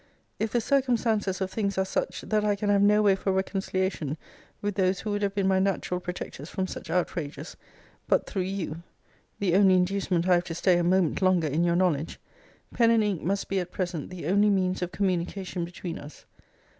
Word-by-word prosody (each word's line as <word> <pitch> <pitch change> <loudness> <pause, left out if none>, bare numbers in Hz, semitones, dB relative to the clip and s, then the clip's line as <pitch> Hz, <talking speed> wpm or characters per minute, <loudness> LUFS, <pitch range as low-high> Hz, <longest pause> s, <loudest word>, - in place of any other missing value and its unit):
If 220 0 -1
the 240 - +2
circumstances 225 -7 +1
of 190 0 -1
things 200 -2 -2
are 190 - +2
such, 190 - -2
that 215 -1 0
I 205 -1 +2
can 205 0 0
have 200 -1 +4
no 210 +1 +5
way 200 -2 +5
for 195 0 -1
reconciliation 190 -5 -1 0.4
with 205 0 -2
those 185 -1 +1
who 215 - -3
would 205 0 -1
have 200 -1 -1
been 195 -2 +1
my 190 0 +3
natural 190 -2 0
protectors 180 -4 -6
from 190 -2 -2
such 185 -2 -8
outrages, 160 -3 -3 0.5
but - - +2
through 195 - -3
you, 180 -4 -4 0.6
[the 190 -4 0
only 190 0 +6
inducement 185 -1 +1
I 185 - +5
have 175 0 +3
to 165 - -5
stay 180 +1 +3
a - - +1
moment 180 -1 +2
longer 185 -4 +3
in 150 +4 0
your 170 0 +2
knowledge,] 165 -4 0 0.5
pen 230 -1 +4
and 230 -1 +4
ink 200 -6 -1
must 195 +3 -1
be, 195 - 0
at 180 - -5
present, 175 -6 -3
the 180 -4 -7
only 200 +5 +3
means 185 -2 +1
of 180 0 -2
communication 185 -1 -2
between 175 0 -6
us. 145 +1 -12
190 Hz, 205 wpm, -27 LUFS, 175-200 Hz, 0.6 s, only